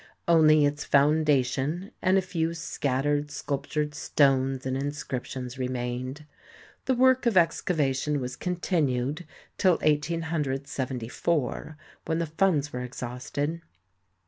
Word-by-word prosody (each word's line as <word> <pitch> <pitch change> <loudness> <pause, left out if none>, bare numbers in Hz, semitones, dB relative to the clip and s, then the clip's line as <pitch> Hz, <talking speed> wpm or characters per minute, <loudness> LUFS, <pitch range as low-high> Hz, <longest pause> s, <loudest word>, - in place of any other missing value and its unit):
Only 155 -3 +6
its 145 +1 -1
foundation 145 +3 +2
and 185 +1 +3
a 190 - +2
few 170 -3 -2
scattered 145 -2 -1
sculptured 145 +1 -3
stones 135 -3 +2
and 130 0 -1
inscriptions 135 -2 -4
remained. 125 +3 -3 0.6
The 260 - +2
work 260 0 +4
of 230 - +2
excava 165 -5 +2
tion 145 +2 -1
was 125 0 -4
continued 155 -4 -1 0.3
till 185 -2 +5
1874 150 -2 -1 0.3
when 160 0 0
the 170 - 0
funds 155 -3 +1
were 125 - -3
exhausted. 125 +6 -4
145 Hz, 110 wpm, -27 LUFS, 130-165 Hz, 0.6 s, Only